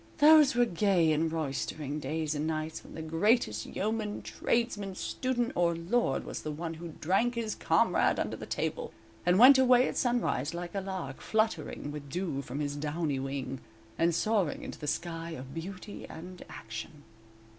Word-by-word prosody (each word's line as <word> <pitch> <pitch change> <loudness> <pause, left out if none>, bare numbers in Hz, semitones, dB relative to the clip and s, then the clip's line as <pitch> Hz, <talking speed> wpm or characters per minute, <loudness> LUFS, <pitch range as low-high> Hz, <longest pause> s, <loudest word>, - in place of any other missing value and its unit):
Those 300 -3 +7
were 245 0 +5
gay 180 -5 +2
and 160 +1 +1
roystering 150 -1 -3
days 155 0 -2
and 150 +1 -2
nights 155 0 -3
when - - -12
the 160 - -5
greatest 165 - +1
yeoman, 210 0 -2
tradesman, 205 -5 -1
student, 250 +3 -1
or 170 -1 +2
lord, 170 - 0
was - - -6
the 155 - -5
one 165 +2 -4
who 165 0 -8
"drank 195 +9 +2
his 225 -2 -2
comrade - - +2
under - - -1
the - - -8
table" 480 -1 -3 0.3
and 180 +1 +5
went 260 +4 +9
away 255 -1 +6
at - - -4
sunrise 230 - 0
like 175 0 -5
a 195 - -1
lark, 185 -8 -5
fluttering 215 -9 -1
with 145 -1 -7
dew 170 -3 -2
from 135 +2 -5
his 145 -1 -2
downy 150 -1 -1
wing, 135 -1 -4 0.4
and 170 +4 +2
soaring 205 -8 +1
into - - -7
the 150 - -6
sky 165 +1 -3
of 135 -3 -8
beauty 185 +4 -7
and 180 +2 -9
action. 115 +7 -8
170 Hz, 170 wpm, -30 LUFS, 150-215 Hz, 0.4 s, went